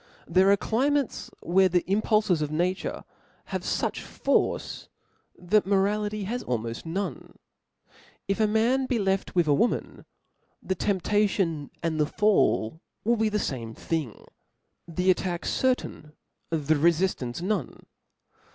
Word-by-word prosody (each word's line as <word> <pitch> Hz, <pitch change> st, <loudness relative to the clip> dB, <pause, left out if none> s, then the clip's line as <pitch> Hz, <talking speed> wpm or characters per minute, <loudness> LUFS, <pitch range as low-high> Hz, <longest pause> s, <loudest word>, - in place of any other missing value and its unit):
There 185 Hz, +3 st, +4 dB
are 200 Hz, -, +5 dB
climates 275 Hz, +5 st, 0 dB
where 190 Hz, +2 st, +3 dB
the 180 Hz, -1 st, +2 dB
impulfes 210 Hz, -3 st, +2 dB
of 150 Hz, -, -1 dB
nature 180 Hz, +5 st, -1 dB, 0.5 s
haye -, -, -2 dB
fuch -, -, -2 dB
force -, -, -1 dB, 0.5 s
that 195 Hz, +3 st, +2 dB
morality 205 Hz, +1 st, +1 dB
has 240 Hz, +6 st, -3 dB
almoft 115 Hz, +3 st, -3 dB
none. 175 Hz, -4 st, -4 dB, 0.9 s
If 195 Hz, +2 st, -1 dB
a 215 Hz, -, +4 dB
man 235 Hz, +5 st, +2 dB
be 250 Hz, -, +1 dB
left 195 Hz, -3 st, -1 dB
with, 175 Hz, -2 st, +4 dB
a 145 Hz, -, +4 dB
woman, 230 Hz, +12 st, 0 dB, 0.5 s
the 190 Hz, -, -2 dB
temptation 190 Hz, -5 st, 0 dB
and 160 Hz, -2 st, -1 dB
the 150 Hz, -, +3 dB
fall 165 Hz, -, +2 dB, 0.2 s
will 235 Hz, +2 st, +2 dB
be 220 Hz, 0 st, +2 dB
the 210 Hz, -, 0 dB
fame 115 Hz, -, -3 dB
thing; 155 Hz, -9 st, -4 dB, 0.6 s
the 180 Hz, +2 st, +2 dB
attack 180 Hz, -1 st, -2 dB
cer^ 260 Hz, -1 st, +2 dB
tain, 150 Hz, -10 st, -10 dB, 0.4 s
the 155 Hz, -2 st, +1 dB
itfiftanpe 155 Hz, -5 st, +1 dB
nope. 190 Hz, -, -3 dB
190 Hz, 135 wpm, -26 LUFS, 160-210 Hz, 0.9 s, are